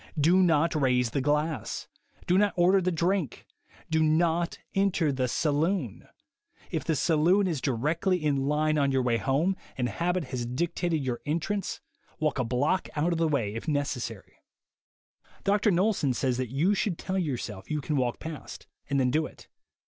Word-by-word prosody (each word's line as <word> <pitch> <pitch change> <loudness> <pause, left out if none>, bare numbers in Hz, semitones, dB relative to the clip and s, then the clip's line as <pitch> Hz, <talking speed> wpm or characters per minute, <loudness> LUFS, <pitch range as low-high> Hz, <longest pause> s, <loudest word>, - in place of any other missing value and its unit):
Do 175 +6 +5
not 165 -2 +3
raise 125 -5 +2
the 140 - 0
glass. 150 +2 -1 0.4
Do 180 - +2
not 205 +1 +3
order 185 +2 +4
the 185 0 0
drink. 170 - -1 0.5
Do 160 0 +3
not 165 +2 +2 0.2
enter 195 -6 +2
the 130 -2 0
saloon. 150 - -1 0.6
If - - -2
the 160 - 0
saloon 170 +7 +3
is 160 -7 -1
directly 155 - 0
in 145 -4 0
line 155 +1 +2
on 140 -1 +2
your 130 -1 +1
way 120 -2 +2
home, 145 +10 +1 0.2
and 125 -2 0
habit 175 - -1
has 120 -2 -2
dictated 165 +3 -1
your 125 -2 -2
entrance, 175 +6 -2 0.4
walk 155 -4 0
a - - +2
block 130 +10 0
out 155 +4 +1
of 165 - -2
the 165 - +3
way 120 -9 0
if 115 - -6
necessary. 135 -8 -3 1.1
Mr. 205 +1 +3
Knowlson 180 - +1
says 130 -1 0
that 130 -2 -2
you 155 - +2
should 195 -3 -1
tell 190 0 -2
your 150 -8 -1
self 105 -5 -7
you 150 - -1
can 150 +1 -2
walk 125 -3 0
past, 160 -2 -8 0.2
and 140 0 +1
then 125 -1 +2
do 155 +3 +1
it. - - -17
155 Hz, 175 wpm, -28 LUFS, 130-175 Hz, 1.1 s, Do